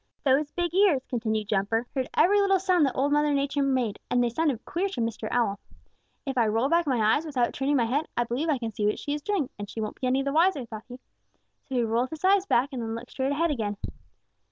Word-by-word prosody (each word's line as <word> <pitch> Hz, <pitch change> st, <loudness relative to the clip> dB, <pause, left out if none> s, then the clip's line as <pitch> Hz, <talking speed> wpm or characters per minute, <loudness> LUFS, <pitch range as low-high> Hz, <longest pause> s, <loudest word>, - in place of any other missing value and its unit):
"Those, 285 Hz, +1 st, +2 dB
big 345 Hz, +1 st, -2 dB
ears," 360 Hz, -9 st, +3 dB
continued 220 Hz, -3 st, -2 dB
Jumper, 210 Hz, +4 st, 0 dB
"heard 260 Hz, -2 st, -2 dB
every 405 Hz, +3 st, +5 dB
little 390 Hz, -1 st, +3 dB
sound 360 Hz, -5 st, +3 dB
that 265 Hz, -, -4 dB
Old 280 Hz, +2 st, +1 dB
Mother 295 Hz, 0 st, +2 dB
Nature 280 Hz, +1 st, 0 dB
made, 255 Hz, -6 st, 0 dB
and 245 Hz, 0 st, +2 dB
they 240 Hz, -, 0 dB
sounded 275 Hz, -3 st, -1 dB
queer 380 Hz, +4 st, -1 dB
to 390 Hz, -, -6 dB
Mr. 230 Hz, -1 st, -2 dB
Owl. 220 Hz, -5 st, 0 dB, 0.7 s
'If 270 Hz, -2 st, -1 dB
I 230 Hz, -, +3 dB
roll 225 Hz, +5 st, +1 dB
back 335 Hz, 0 st, +2 dB
my 255 Hz, -4 st, +1 dB, 0.2 s
eyes 300 Hz, -, -1 dB
without 260 Hz, -7 st, -1 dB
turning 275 Hz, +2 st, 0 dB
my 235 Hz, -, +2 dB
head, 280 Hz, +7 st, -1 dB
I 240 Hz, -, +3 dB
believe 250 Hz, +7 st, -2 dB
I 295 Hz, -, +2 dB
can 230 Hz, -2 st, -4 dB
see 210 Hz, 0 st, -1 dB
what 210 Hz, -, 0 dB
she 285 Hz, -, -3 dB
is 295 Hz, -, -3 dB
doing, 355 Hz, -5 st, -1 dB
and 205 Hz, -1 st, -6 dB
she -, -, -7 dB
won't 215 Hz, -1 st, -5 dB
be 255 Hz, -, 0 dB
any 265 Hz, +2 st, +1 dB
the 275 Hz, 0 st, -2 dB
wiser,' 325 Hz, -4 st, +3 dB
thought 220 Hz, -1 st, -9 dB
he. 245 Hz, -, -9 dB, 0.7 s
So 265 Hz, -, -6 dB
he 245 Hz, -, +2 dB
rolled 230 Hz, +3 st, 0 dB
his 315 Hz, +3 st, -5 dB
eyes 390 Hz, 0 st, +4 dB
back 255 Hz, -3 st, +2 dB
and 250 Hz, -, -3 dB
then 225 Hz, 0 st, -3 dB
looked 235 Hz, +2 st, -9 dB
straight 265 Hz, +1 st, -1 dB
ahead 320 Hz, +3 st, +1 dB
again. 210 Hz, -7 st, -2 dB
265 Hz, 250 wpm, -27 LUFS, 230-300 Hz, 0.7 s, every